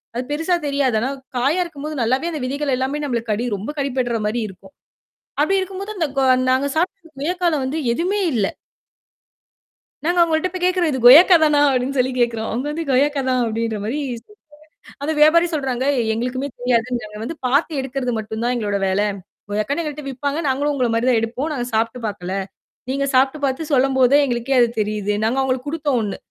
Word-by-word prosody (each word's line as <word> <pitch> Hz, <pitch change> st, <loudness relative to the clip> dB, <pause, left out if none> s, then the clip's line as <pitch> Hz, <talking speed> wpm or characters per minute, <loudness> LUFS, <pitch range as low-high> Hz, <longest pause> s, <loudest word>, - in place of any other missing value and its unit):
அது 245 Hz, -, -2 dB
பெருசா 325 Hz, +4 st, +1 dB
தெரியாது. 280 Hz, -4 st, +1 dB
ஆனா 245 Hz, +4 st, -1 dB, 0.3 s
காயா 280 Hz, +9 st, +2 dB
இருக்கும்போது 305 Hz, -2 st, -7 dB
நல்லாவே 260 Hz, +8 st, +1 dB
அந்த 310 Hz, -, -4 dB
விதைகள் 280 Hz, +1 st, -1 dB
எல்லாமே 265 Hz, +3 st, -2 dB
நம்மளுக்கு 235 Hz, -5 st, -2 dB
கடி, 210 Hz, +3 st, -1 dB
ரொம்ப 210 Hz, +9 st, -5 dB
கடிபட்றமாரி 240 Hz, -5 st, -1 dB
இருக்கும். 190 Hz, 0 st, -14 dB, 0.7 s
அப்பிடி 390 Hz, +6 st, +3 dB
இருக்கும்போது 390 Hz, +3 st, -5 dB
அந்தக் 315 Hz, -6 st, -2 dB
கொ -, -, +3 dB, 0.3 s
நாங்க 260 Hz, +2 st, +2 dB
சாப்பிட்டிருந்த 330 Hz, -1 st, -2 dB
கொயக்காவுல 340 Hz, 0 st, 0 dB
வந்து 280 Hz, +5 st, -2 dB
எதுவுமே 365 Hz, +10 st, -1 dB
இல்ல. 210 Hz, -4 st, +2 dB, 1.6 s
நாங்க 350 Hz, +2 st, +1 dB
அவுங்கள்ட்ட 330 Hz, +1 st, +2 dB
போய் 365 Hz, -, -4 dB
கேட்கிறோம் 365 Hz, -2 st, +2 dB
"இது 265 Hz, -, -1 dB
கொயக்கா 320 Hz, +9 st, +9 dB
தானா?" 300 Hz, -1 st, +4 dB
அப்பிடின்னு 265 Hz, +1 st, -1 dB
சொல்லிக் 255 Hz, 0 st, 0 dB
கேட்கிறோம். 230 Hz, -2 st, 0 dB
அவுங்க 250 Hz, +5 st, -2 dB
வந்து 325 Hz, +2 st, -3 dB
"கொயக்கா 280 Hz, +2 st, +2 dB
தான்" 255 Hz, 0 st, +2 dB
அப்பிடின்ற 225 Hz, 0 st, -2 dB
மாரி 255 Hz, +8 st, -2 dB, 0.2 s
சொல்லிடாங்க 330 Hz, -, -19 dB, 0.6 s
அது 305 Hz, -, 0 dB
வியாபாரி 330 Hz, +3 st, +6 dB
சொல்றாங்க, 265 Hz, -4 st, -1 dB, 0.3 s
"எங்களுக்குமே 250 Hz, +4 st, -2 dB
தெரியாது. 245 Hz, -1 st, +1 dB
நாங்க 210 Hz, -1 st, -9 dB
வந்து 290 Hz, +8 st, -5 dB
பார்த்து 280 Hz, +6 st, +2 dB
எடுக்கிறது 265 Hz, -1 st, -3 dB
மட்டும்தான் 220 Hz, +3 st, -2 dB
எங்களோட 205 Hz, -4 st, -1 dB
வேல. 190 Hz, +2 st, +1 dB, 0.5 s
கொயக்கான்னு 215 Hz, +11 st, -1 dB
எங்கட்ட 300 Hz, -1 st, -5 dB
விற்பாங்க. 280 Hz, +3 st, -3 dB
நாங்களும் 285 Hz, +2 st, 0 dB
உங்கள 255 Hz, -3 st, +1 dB
மாதிரிதான் 235 Hz, +1 st, +2 dB
எடுப்போம். 250 Hz, +7 st, -3 dB
நாங்க 245 Hz, -4 st, -3 dB
சாப்பிட்டு 230 Hz, +3 st, 0 dB
பார்க்கல. 190 Hz, -3 st, -5 dB, 0.6 s
நீங்கச் 275 Hz, +1 st, -1 dB
சாப்பிட்டு 265 Hz, +3 st, +3 dB
பார்த்து 275 Hz, +3 st, -1 dB
சொல்லும்போதே 265 Hz, 0 st, +4 dB
எங்களுக்கே 245 Hz, 0 st, -1 dB
அது 240 Hz, -, +5 dB
தெரியுது. 210 Hz, -1 st, -1 dB
நாங்க 235 Hz, +4 st, 0 dB
அவங்களுக்குக் 260 Hz, +1 st, -2 dB
கொடுத்தோம் 295 Hz, -5 st, 0 dB
ஒன்னு. 205 Hz, -2 st, -3 dB
265 Hz, 170 wpm, -20 LUFS, 235-300 Hz, 1.6 s, கொயக்கா